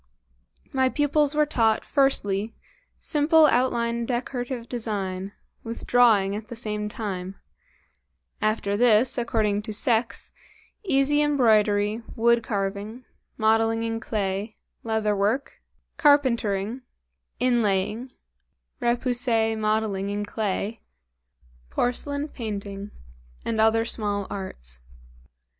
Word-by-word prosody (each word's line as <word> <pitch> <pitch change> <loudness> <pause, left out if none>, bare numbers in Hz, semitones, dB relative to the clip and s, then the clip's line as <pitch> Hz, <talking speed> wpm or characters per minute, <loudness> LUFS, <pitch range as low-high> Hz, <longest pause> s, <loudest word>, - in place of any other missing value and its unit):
My 260 -1 +3
pupils 295 +1 +1
were 300 0 +4
taught, 225 -6 +1
firstly, 220 -7 +1 0.4
simple 310 +1 +4
outline 235 -3 +1
decorative 245 -1 -3
design 200 -5 -3 0.3
with 230 +1 -6
drawing 215 -5 +4
at 215 +1 -6
the 235 - -7
same 210 -2 -3
time; 195 -3 -5 1.1
after 215 -2 0
this, 235 +2 +4
according 215 -3 0
to 215 +1 -5
sex, 230 +2 0 0.5
easy 290 -4 +2
embroidery, 220 -6 +3
wood 235 +1 +3
carving, 205 +3 -4 0.3
modeling 225 +1 +2
in 225 0 -2
clay, 205 -1 -3 0.3
leather 220 -2 0
work, 215 +8 -1 0.4
carpentering, 245 - +2 0.6
inlaying, 230 -1 +1 0.7
repoussé 240 -2 +1
modeling 215 -2 0
in 205 0 -2
clay, 210 +1 -3 0.9
porcelain 285 +4 -1
painting, 205 -5 -6 0.6
and 220 -1 0
other 225 +1 +3
small 205 -3 -2
arts. 60 - -5
225 Hz, 95 wpm, -25 LUFS, 205-245 Hz, 1.1 s, were